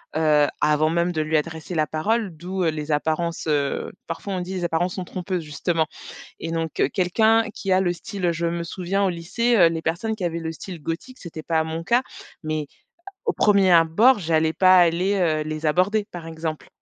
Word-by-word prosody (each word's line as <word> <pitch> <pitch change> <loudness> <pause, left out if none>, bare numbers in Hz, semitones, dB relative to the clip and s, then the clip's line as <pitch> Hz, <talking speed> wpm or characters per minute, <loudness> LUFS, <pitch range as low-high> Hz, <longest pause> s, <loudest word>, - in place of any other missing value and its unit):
Heu, 150 -2 +4
avant 150 +1 +3
même 170 +1 +1
de 155 -3 -1
lui 155 +1 -1
adresser 160 +2 -4
la 155 -1 +2
parole, 200 +4 -1
d'où, 185 +2 -3
heu, 165 - +3
les 155 0 -4
apparences, 165 +3 -1
heu, 145 -2 0 0.2
parfois 170 +4 -5
on - - -2
dit: 185 +2 -5
«les 180 - -3
apparences 175 +2 0
sont 185 - -4
trompeuses» 180 -1 -4
justement, 160 +2 -1 0.6
et 165 - -4
donc 165 -1 -3
heu, - - +4
quelqu'un 220 +5 +3
qui 195 - -4
a 185 - +4
le 175 -2 +1
style 180 +1 -5
heu, 170 - +2
je 170 +1 -2
me 170 0 -2
souviens 185 +3 -1
au - - +3
lycée, 215 +8 0
heu, 170 -4 +7
les 165 -1 -3
personnes 190 +8 -2
qui 185 - -4
avaient 170 -1 -2
le 160 - -4
style 170 -1 -9
gothique, 165 - -5
c'était 160 -3 -8
pas 160 -1 +1
mon 160 +1 -5
cas, 240 +5 +3 0.4
mais 155 -1 -2 0.6
au 440 - +1
1er 200 -3 +4
abord, 175 +10 +5
j'allais 160 -1 +1
pas 185 +1 +5
aller, 175 +3 +3
heu, 165 -5 +1
les 155 0 -5
aborder 195 +7 +2
par 170 -2 -7
exemple. 160 -1 -5
170 Hz, 210 wpm, -23 LUFS, 160-185 Hz, 0.6 s, heu